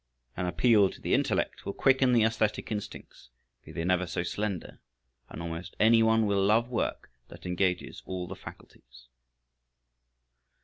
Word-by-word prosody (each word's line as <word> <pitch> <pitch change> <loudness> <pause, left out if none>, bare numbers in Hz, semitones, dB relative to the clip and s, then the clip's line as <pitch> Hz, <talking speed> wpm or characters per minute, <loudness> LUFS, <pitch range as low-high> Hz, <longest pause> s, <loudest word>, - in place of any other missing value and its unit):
An 90 - -2
appeal 105 +1 +4
to - - -12
the - - -2
intellect - - 0
will 100 - -4
quicken 135 -1 +3
the 120 -2 +4
æsthetic 110 -1 0
instincts, 105 - -7 0.3
be - - -12
they 80 - -4
never 90 +1 +1
so 85 +1 -2
slender, 100 -1 -4 0.5
and 85 - -7
almost 85 +1 -6
any 115 +1 +5
one 110 0 +3
will 100 -1 +1
love 110 +4 +3
work 120 - -3 0.2
that - - -13
engages 90 0 -1
all 90 -1 -4
the 95 - -7
faculties. - - -14
100 Hz, 150 wpm, -29 LUFS, 90-110 Hz, 0.5 s, any